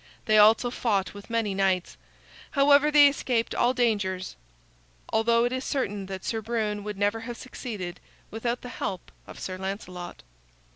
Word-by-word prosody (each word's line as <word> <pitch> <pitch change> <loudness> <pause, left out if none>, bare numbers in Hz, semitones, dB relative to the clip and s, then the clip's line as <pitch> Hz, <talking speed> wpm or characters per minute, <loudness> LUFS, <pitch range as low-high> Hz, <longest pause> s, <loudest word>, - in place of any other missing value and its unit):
They 215 -1 +5
also 220 +3 +5
fought 205 -6 0
with 205 +2 -12
many 225 -3 0
knights. 190 -2 0 0.6
However, 285 +1 +5
they 295 -1 +8
escaped 250 -4 0
all 240 - +3
dangers, 205 -7 -1 0.8
although 230 +1 +3
it 245 - 0
is 260 0 -2
certain 205 -9 -2
that 190 -1 -7
Sir 225 -1 -2
Brune 215 -2 -2
would 210 -1 -5
never 205 +2 +1
have 235 +1 -7
succeeded 210 -9 -6 0.3
without 235 +2 -2
the 245 - -8
help 190 -6 -5 0.2
of - - -11
Sir 185 -1 -5
Lancelot. 185 -2 -6
220 Hz, 155 wpm, -27 LUFS, 195-240 Hz, 0.8 s, they